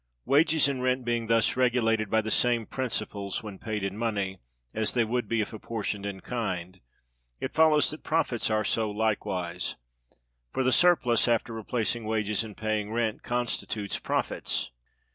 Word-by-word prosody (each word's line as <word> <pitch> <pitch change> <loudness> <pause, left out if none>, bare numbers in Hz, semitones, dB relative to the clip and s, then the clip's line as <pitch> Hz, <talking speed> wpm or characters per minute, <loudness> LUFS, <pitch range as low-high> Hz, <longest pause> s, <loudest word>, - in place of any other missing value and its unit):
Wages 155 +2 +4
and 135 -2 -2
rent 130 0 +1
being 120 -1 0
thus 115 0 +3
regulated 115 -4 +2
by 110 +2 +3
the 110 0 -4
same 120 -2 +2
principles 105 -7 -3
when 105 -3 -8
paid 110 -3 -3
in 100 0 -2
money, 100 -4 -2 0.3
as 110 +2 0
they 120 - +4
would 120 +2 -1
be 115 -1 +1
if 105 - -4
apportioned 105 -2 -4
in 95 -2 -6
kind, 95 -6 -3 0.6
it - - -4
follows 155 -2 +5
that 155 - -8
Profits 155 -9 0
are 110 0 +2
so 110 0 +1
likewise. 95 -5 -1 0.8
For 130 - +1
the 130 - +3
surplus, 125 -10 +4
after 115 0 +1
replacing 115 +1 -2
wages 105 -1 0
and 105 -3 -9
paying 110 -1 -1
rent, 115 -1 -1
constitutes 120 -4 -2
Profits. - - -1
110 Hz, 160 wpm, -28 LUFS, 105-125 Hz, 0.8 s, follows